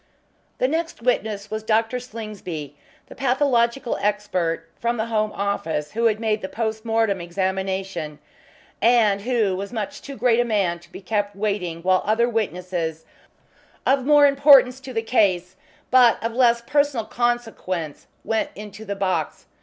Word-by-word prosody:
The 255 - +2
next 325 -2 -3
witness 215 -4 -1
was 215 0 -3
Dr. 225 +3 +1
Slingsby, 210 - -7 0.3
the - - -12
pathological 250 -2 +1
expert 200 -5 -1
from 235 +1 -1
the 220 - -1
Home 215 -2 0
Office 165 -7 -2
who 230 +1 -1
had 215 -2 +2
made 220 -1 0
the 190 - -5
post 220 -1 -3
mortem 225 -4 +1
examination, 190 -3 -3 0.6
and 225 -4 +4
who 220 -4 +1
was 200 +3 -5
much 215 -4 -5
too 280 - -8
great 235 +1 +3
a - - +4
man 200 -7 0
to 170 +1 -20
be - - -9
kept 205 +1 -2
waiting 195 -5 -2
while 185 0 +3
other 220 +3 +2
witnesses 180 -7 -3 0.8
of 270 0 +3
more 295 +1 +6
importance 275 -2 +6
to 265 -1 -9
the 225 -2 -2
case 190 -6 +1 0.4
but 250 -2 +6
of 230 0 -2
less 235 -1 +3
personal 285 -4 +1
consequence 225 -10 -2 0.2
went 220 -1 -1
into 210 +1 -9
the 200 -1 -4
box. 185 -6 -2
215 Hz, 155 wpm, -23 LUFS, 190-240 Hz, 0.8 s, more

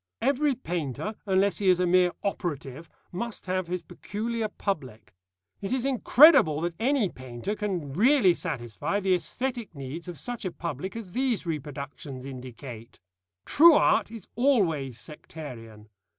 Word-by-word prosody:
Every 280 +1 +2
painter, 175 - -3
unless 195 +1 +2
he 200 - 0
is 180 -1 +4
a 180 - +3
mere 180 0 +4
operative, 160 -6 -4 0.2
must 235 +5 -5
have 185 -1 -1
his 180 0 -3
peculiar 225 +2 -3
public. 130 - -5 0.5
It 195 - -4
is 260 0 0
incredible 265 - +6
that 170 0 -1
any 255 -2 +2
painter 130 - -5
can 185 -10 -3
really 225 - +5
satisfy 150 - -3
the 190 -2 +2
æsthetic 235 +2 -3
needs 140 +6 -7
of 175 -3 -7
such 240 - -5
a 185 - -2
public 170 - -5
as 220 -6 -7
these 250 -3 0
reproductions 140 -4 -6
indicate. 125 -3 -9 0.5
True 330 +1 +7
art - - +3
is 225 -4 -10
always 170 - +1
sectarian. 120 -9 -10
180 Hz, 140 wpm, -27 LUFS, 140-225 Hz, 0.5 s, True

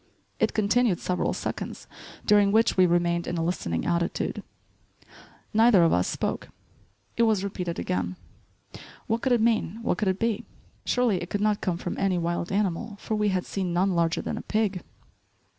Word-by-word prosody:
It - - +1
continued 215 -1 +2
several 180 -1 -1
seconds, - - -5 0.4
during 205 -1 +5
which 225 +2 +3
we 185 -1 +5
remained 170 0 +1
in 175 - -2
a 165 - 0
listening 85 - -2
attitude. 170 0 -1 1.1
Neither 220 -4 +6
of 165 - +4
us 90 +1 +2
spoke. - - -3 0.7
It - - +2
was 220 -4 +3
repeated 180 -4 -4
again; 90 0 -2 0.9
what 225 +1 -1
could 265 - 0
it 240 -2 +4
mean, 220 -3 +1
what 180 - 0
could 210 - 0
it 190 0 +1
be? 225 -1 -1 0.4
Surely 240 -7 +1
it 175 - -6
could 205 - -1
not 210 -1 +1
come 175 -3 -1
from 175 - -5
any 195 -2 +1
wild 170 0 -2
animal 205 +2 -1
for - - -4
we 210 -1 +1
had 185 -2 -1
seen 185 -3 -3
none 190 +3 +2
larger 170 -1 +1
than - - -3
a - - -6
pig. 210 -4 -1
190 Hz, 175 wpm, -26 LUFS, 175-215 Hz, 1.1 s, Neither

